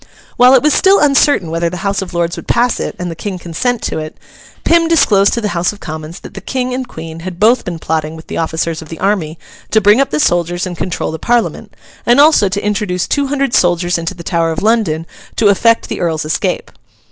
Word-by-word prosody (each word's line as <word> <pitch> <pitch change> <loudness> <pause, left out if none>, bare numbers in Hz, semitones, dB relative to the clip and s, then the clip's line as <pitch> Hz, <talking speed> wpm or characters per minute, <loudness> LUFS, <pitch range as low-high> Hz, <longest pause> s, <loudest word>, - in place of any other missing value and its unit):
While 250 +2 +6
it 260 - +3
was 300 - +3
still 390 +1 +4
uncertain 275 - +3
whether 165 +1 0
the 180 +2 -7
House 200 0 0
of 190 - -6
Lords 170 -1 -1
would - - -9
pass 240 +1 +1
it - - -4
and 180 -1 -4
the - - -7
King 190 +2 -5
consent 215 +8 -2
to - - -2
it, 155 0 -7 0.5
Pym 335 0 +3
disclosed 205 -12 +4
to 235 - -1
the 210 - -1
House 175 0 0
of 210 - -13
Commons 155 +1 -7
that - - -11
the 195 - -8
King 255 +4 -3
and 255 0 -3
Queen 160 -6 -8
had 175 +1 -7
both 230 +4 +4
been 175 -2 -5
plotting 160 -1 -2
with 160 - -11
the - - -7
officers 165 0 -2
of 160 - -12
the 165 - -7
army 185 -5 -1 0.3
to 220 - +3
bring 210 +5 +4
up 275 - 0
the 150 - -1
soldiers 175 +2 +1
and 180 -1 -5
control 180 -1 -3
the 160 - -6
Parliament, 240 -1 -1 0.3
and 240 +3 +3
also 290 -9 +5
to 200 +1 -3
introduce 195 -3 -1
two 285 -1 0
hundred 275 -2 -1
soldiers 175 0 +2
into 165 +3 -4
the 170 - -10
Tower 165 -1 0
of 160 - -4
London 210 -8 +1 0.3
to 210 - +3
effect 230 +3 +3
the - - -5
Earl's 160 -3 -1
escape. 155 - -2
185 Hz, 235 wpm, -15 LUFS, 165-235 Hz, 0.5 s, While